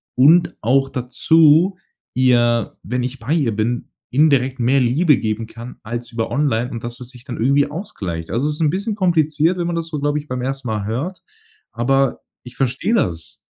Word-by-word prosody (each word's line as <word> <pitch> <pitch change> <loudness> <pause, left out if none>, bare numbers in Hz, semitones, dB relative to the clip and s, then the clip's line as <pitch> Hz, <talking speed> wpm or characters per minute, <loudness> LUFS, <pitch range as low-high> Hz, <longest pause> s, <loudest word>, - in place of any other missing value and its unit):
Und 160 +7 +5
auch 135 +4 +2
dazu, 160 +8 +3 0.4
ihr 120 -3 +2
wenn 125 +5 -2
ich 130 +1 -4
bei 130 +7 -2
ihr 130 -10 +1
bin, 115 +3 -2 0.2
indirekt 135 -2 +2
mehr 130 +3 +3
Liebe 140 +4 +3
geben 110 +1 -2
kann 115 +2 -10
als 120 +1 -6
über 115 -1 -3
online 125 -4 0
und 115 -1 -6
dass 120 +1 -6
es 125 -1 -9
sich 125 -2 -14
dann 125 -4 -6
irgendwie 140 +4 +2
ausgleicht. 95 - -6
Also, 125 +6 0
es 150 - -2
ist 165 - -6
'n 155 - +3
bisschen 205 +3 -2
kompliziert, 165 -2 +2
wenn 175 -1 -1
man 175 - -2
das 165 -1 -3
so, 155 -3 -4
glaube 145 +1 0
ich, 150 - -11
beim 125 0 -4
1. 135 0 -4
Mal 105 -2 -2
hört, 140 - -4 0.5
aber 135 +2 +1 0.2
ich 125 0 -12
verstehe 135 - -1
das. 85 - -2
130 Hz, 195 wpm, -19 LUFS, 120-150 Hz, 0.5 s, Und